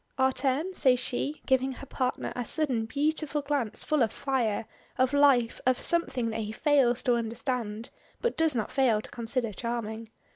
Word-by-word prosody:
"Our 265 0 +4
turn?" 280 +8 -1
says 255 -7 +3
she, 275 +4 -3
giving 265 0 +2
her 275 - -10
partner 255 -1 -2
a 245 - -2
sudden 245 -4 -1
beautiful 295 +2 0
glance 280 -6 -1
full 305 -2 +1
of 225 -3 +3
fire 240 -6 -1 0.3
of 260 +1 +2
life 275 -5 +4
of 255 0 +2
something 255 -9 0
that 220 - -3
he 215 0 -4
fails 255 -1 +2
to 250 - +3
understand, 230 -1 -3 0.3
but 475 - -1
does 320 -3 +1
not 225 - -2
fail 250 -6 +3
to - - -11
consider 235 -1 -1
charming. 230 0 -4
255 Hz, 175 wpm, -28 LUFS, 230-280 Hz, 0.3 s, Our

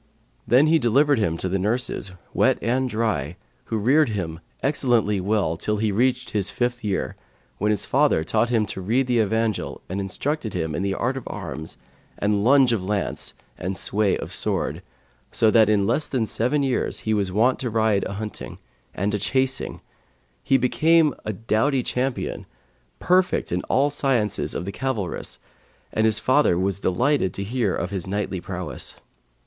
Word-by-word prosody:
Then 130 +5 +5
he 160 +1 +4
delivered 140 +2 +3
him 85 -6 0
to 95 - -2
the 95 +1 -1
nurses, 105 -2 -1 0.2
wet - - +3
and 130 +2 0
dry, 105 - -1 0.3
who 110 - -2
reared 135 +7 +3
him 85 -6 -3 0.2
excellently 120 -8 +2
well 95 -5 0
till 105 +4 -1
he 110 0 0
reached 125 +3 +1
his 100 -2 0
fifth 120 +1 -2
year, 100 -3 -2 0.4
when 105 - +1
his 105 -3 0
father 80 - +2
taught 110 +7 +1
him 115 -3 +2
to 95 - -6
read 120 +8 +1
the 125 -2 +1
Evangel 110 0 0
and 95 +2 -3
instructed 110 +4 -3
him 80 -3 -2
in 85 - -2
the 100 0 -1
art 130 +3 -1
of 130 - -7
arms 80 -5 -6 0.4
and 100 0 +1
lunge 130 0 +5
of 105 -5 -1
lance 100 0 -3 0.2
and 95 +1 -3
sway 105 -1 +1
of - - -7
sword, - - -1 0.5
so 110 - +3
that 110 -2 +5
in 100 -2 +3
less 120 +8 +1
than 125 -4 0
seven 125 +7 0
years 130 -2 -1
he 110 - 0
was 100 -3 0
wont 115 +7 +2
to 125 - -2
ride 110 -3 +2
a - - -4
hunting, 105 +1 -6 0.4
and 100 +3 -1
a 105 - 0
chasing; 130 +5 -1 0.6
he 135 - +3
became 155 +4 +3
a 110 - -1
doughty 115 +6 0
champion, 130 +2 -2 0.5
perfect 180 +1 +2
in 90 +1 0
all 140 +2 +2
the 145 - -6
science 115 - +1 0.2
of 90 - -3
the 100 - -4
cavalarice 115 -7 -3 0.6
and 110 - +2
his 110 -1 +2
father 130 -9 +3
was 95 +1 -1
delighted 100 - +1
to 100 - -3
hear 110 -1 0
of 90 +3 -3
his 95 -2 -4
knightly 100 -2 -2
prowess. - - -5
110 Hz, 175 wpm, -23 LUFS, 100-130 Hz, 0.6 s, Then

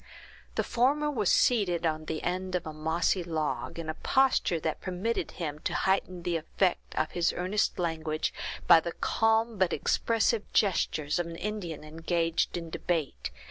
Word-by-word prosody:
The - - +1
former 285 +5 +2
was 215 -9 +1
seated 180 -8 +3
on 155 -1 -1
the 155 0 -4
end 185 +1 -2
of 180 - -1
a 155 - -5
mossy 160 +4 0
log, 160 -2 -2
in 165 -1 -5
a 155 - -1
posture 260 -5 +2
that 160 - -2
permitted 190 +5 -2
him 150 -4 -4
to - - -2
heighten 185 -2 0
the 170 -1 0
effect 175 +3 -1
of 155 - 0
his 175 -1 +1
earnest 185 +4 0
language, 160 -3 -1 0.3
by - - +8
the 170 +1 -4
calm 225 -1 +1
but 185 -2 +3
expressive 230 -1 +1
gestures 165 -6 +1
of 175 - -1
an 165 - -7
Indian 180 -6 -4
engaged 165 +2 -1
in 165 -1 -6
debate. 160 - -2
175 Hz, 165 wpm, -29 LUFS, 160-200 Hz, 0.3 s, by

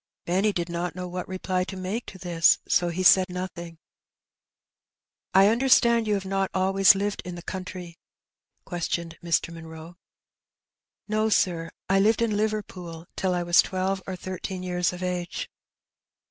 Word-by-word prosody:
Benny 190 +5 +2
did 175 -3 -2
not 170 -1 -3
know 180 0 -5
what 180 0 -5
reply 185 0 -2
to 190 - -7
make 190 +6 -4
to 190 - -9
this, 175 -3 +3
so 175 -1 +2
he 180 +2 -2
said 185 0 +6
nothing. 175 -2 -6 0.8
" - - -61
I 195 +1 +7
understand 235 -1 +4
you 210 - +2
have 195 -1 -3
not 195 0 0
always 195 +1 +5
lived 200 +1 -2
in 180 -1 -6
the 175 - -9
country?" 180 -2 -7 0.7
questioned 170 -1 -3
Mr. 170 0 0
Munroe. 165 +1 -10 1.1
"No, 215 +1 +1
sir; 170 -5 +1 0.2
I 195 +1 +3
lived 220 +3 +3
in 220 -2 0
Liverpool 190 -6 -3
till 185 -1 0
I 175 - -1
was 175 0 +6
twelve 190 0 -2
or 190 - -3
thirteen 185 0 -6
years 180 -1 0
of 180 0 -7
age." 180 -1 -3
185 Hz, 160 wpm, -26 LUFS, 175-195 Hz, 1.1 s, I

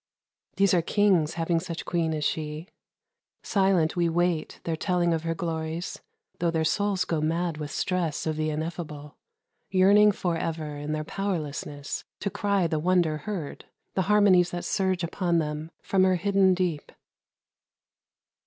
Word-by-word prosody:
These 195 -1 +3
are 175 - +4
kings, 180 -4 +2
Having 165 0 +1
such 170 -1 -6
queen 165 -2 0
as 150 - -3
she. 155 +2 -3 0.8
Silent 190 -5 +2
we 170 -1 +2
wait 170 -1 +1
MUSIC. - - -21
Their 165 - -1
telling 175 0 +1
of 160 - -1
her 165 0 -2
glories, 165 0 -4 0.4
tho' 170 - +1
their 160 -1 0
souls 200 +1 +1
Go 160 -2 -1
mad 165 +1 -1
with 150 -1 -5
stress 170 -4 -1
of 160 -1 -1
the 155 0 -1
ineffable, 155 -2 -5 0.5
Yearning 200 +3 +6
forever 165 -5 -3
in 145 +1 -4
their 155 0 -2
powerlessness 150 -6 -4 0.2
To 200 - -1
cry 200 -3 +1
the 160 -2 0
wonder 170 -2 +2
heard, 170 -3 -6 0.3
the 190 - +1
harmonies 195 -4 +5
That 175 - -5
surge 190 -3 0
upon 175 0 0
them 155 0 -2
from 190 -1 +2
her 185 0 +4
hidden 195 0 +3
deep. 175 -5 -2
170 Hz, 155 wpm, -27 LUFS, 155-185 Hz, 0.8 s, Yearning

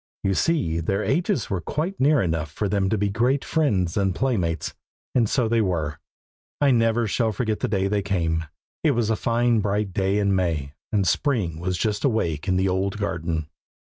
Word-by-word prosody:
You 95 - +2
see 125 - +1
their 100 +5 -1
ages 170 - 0
were 95 -3 -1
quite 165 - -3
near 140 -2 +4
enough 80 -3 -1
for 100 +8 -2
them 100 -1 +1
all - - +1
to 110 - +1
be 105 +1 +1
great 125 +7 +1
friends 100 - +1
and 95 -2 +1
playmates, 95 -11 -1 0.4
and 115 -4 +2
so 125 -4 +1
they 115 0 +2
were. 80 -7 -1 0.6
I 145 -2 +4
never 115 -1 +2
shall 110 +1 +1
forget 110 0 -1
the - - 0
day 95 -2 0
they 100 0 0
came. 85 -4 -1 0.4
It 150 -5 +3
was 115 -2 +1
a - - +2
fine 120 +1 +2
bright 100 -1 -1
day 95 +1 +1
in 100 -1 +2
May, 80 -7 -1 0.2
and 100 -3 +2
Spring 100 - 0
was 90 +1 -2
just 105 0 -1
awake 95 - 0
in 95 - +2
the 95 +1 +2
old 95 +2 0
garden. 85 -6 -2
100 Hz, 200 wpm, -24 LUFS, 90-115 Hz, 0.6 s, near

